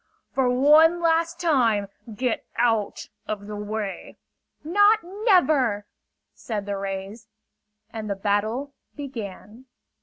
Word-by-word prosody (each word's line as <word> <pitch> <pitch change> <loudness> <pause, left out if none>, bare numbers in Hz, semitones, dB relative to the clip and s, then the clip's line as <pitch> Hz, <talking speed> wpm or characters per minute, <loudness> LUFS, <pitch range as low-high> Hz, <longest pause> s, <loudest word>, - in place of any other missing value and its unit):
"For 265 -2 +2
one 305 +7 +5
last 335 0 +1
time, 235 - +2 0.2
get 240 +2 -2
out 225 -3 0 0.2
of 205 -1 -4
the 210 0 -6
way!" 210 -1 -5 0.5
"Not 410 +7 +5
never!" 335 - +2 0.5
said 210 -3 -5
the 200 -1 -3
rays. 195 +3 -6 0.7
And 220 -2 -5
the 200 - -1
battle 215 +8 -1 0.2
began. 230 -4 -8
235 Hz, 110 wpm, -24 LUFS, 205-310 Hz, 0.7 s, one